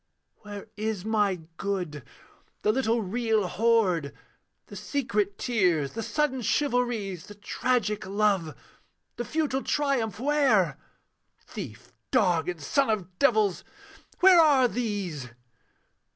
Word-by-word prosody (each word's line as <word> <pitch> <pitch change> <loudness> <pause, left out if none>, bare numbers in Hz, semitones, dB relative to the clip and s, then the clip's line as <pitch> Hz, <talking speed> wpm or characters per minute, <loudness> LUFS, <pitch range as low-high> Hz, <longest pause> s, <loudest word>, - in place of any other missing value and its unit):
Where 205 -1 -9
is 215 -2 -3
my 205 -5 +1 0.2
good? 180 -7 -3 0.6
the 210 - +4
little 230 -2 +1
real 220 +1 0
hoard, 185 -6 +1 0.5
The - - -12
secret 210 -8 -1
tears, 180 - +1
the 225 - -4
sudden 275 +1 -1
chivalries; 235 - -1
The 205 - -11
tragic 215 -1 -1
love, 195 -7 +1 0.6
the 240 - -3
futile 300 -3 -1
triumph 255 -10 0
where? 240 - +2 0.7
Thief, - - -9 0.2
dog, 180 - +2
and 175 -2 -4
son 265 - +1
of 185 -4 -3
devils 215 -9 +3 0.6
where 365 -1 +8
are 280 -5 +5
these? 200 - -3
215 Hz, 110 wpm, -27 LUFS, 185-245 Hz, 0.7 s, where